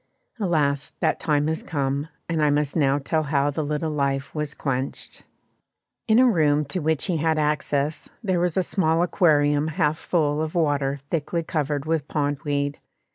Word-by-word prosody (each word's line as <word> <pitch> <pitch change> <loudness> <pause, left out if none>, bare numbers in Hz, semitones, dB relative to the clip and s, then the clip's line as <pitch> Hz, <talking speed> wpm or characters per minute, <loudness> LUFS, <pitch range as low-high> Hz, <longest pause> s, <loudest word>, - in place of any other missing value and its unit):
Alas! 150 -7 0
that - - +1
time 150 -2 +1
has 160 +1 -1
come, 140 0 -2 0.2
and 165 -2 -1
I 150 - +4
must 145 0 0
now 140 -3 +3
tell 155 +3 0
how 145 -1 +1
the 155 +2 -2
little 150 +2 -2
life 140 -2 -1
was 150 -1 -3
quenched. 135 -1 -4 0.9
In 220 0 +4
a 255 - +6
room 150 -9 +3
to 185 - 0
which 160 -2 0
he 180 -4 0
had 160 +1 +1
access, 150 0 -1
there 185 -4 +1
was 175 0 0
a 185 - +3
small 165 -3 +1
aquarium 150 -4 +3
half 155 0 0
full 150 -3 0
of 160 +1 -3
water 145 -4 +1
thickly 165 +1 -1
covered 150 -3 -2
with 155 -2 -1
pond 145 -2 -1
weed. 145 -1 -1
150 Hz, 175 wpm, -24 LUFS, 145-160 Hz, 0.9 s, a